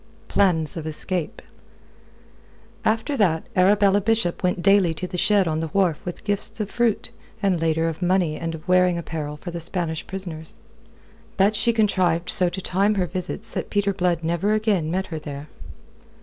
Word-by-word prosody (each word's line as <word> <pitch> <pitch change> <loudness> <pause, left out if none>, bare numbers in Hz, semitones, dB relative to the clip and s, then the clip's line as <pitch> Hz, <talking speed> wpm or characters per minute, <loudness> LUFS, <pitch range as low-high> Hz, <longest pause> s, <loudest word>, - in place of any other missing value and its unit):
PLANS 170 -6 +2
OF 160 -1 -5
ESCAPE 165 +2 -3 1.4
After 225 +6 0
that 165 -6 +2
Arabella 200 +2 +4
Bishop 220 -4 0
went 180 -1 0
daily 195 -4 +4
to 180 - -4
the 180 - -6
shed 200 +1 +3
on 155 -1 0
the 165 - -2
wharf 180 -6 +2
with 175 - -6
gifts 205 +2 -3
of 210 -1 -3
fruit, 235 -3 0 0.3
and 185 -4 +2
later 165 0 +1
of 165 +1 -4
money 180 -3 +2
and 165 0 -4
of 155 - -12
wearing 180 -1 +4
apparel 155 -3 -5
for 175 +4 -7
the 170 - -5
Spanish 165 -1 -2
prisoners. 170 -4 -6 0.8
But 200 +2 +3
she 235 +3 +2
contrived 185 -6 +1
so 185 -4 +4
to 185 +2 -5
time 200 +4 +1
her 185 -2 +1
visits 185 +5 -5
that - - -4
Peter 200 -1 +1
Blood 175 -3 0
never 170 +6 +1
again 210 -7 +1
met 190 +3 -1
her 160 - -3
there. 145 0 -8
180 Hz, 175 wpm, -23 LUFS, 165-200 Hz, 1.4 s, Arabella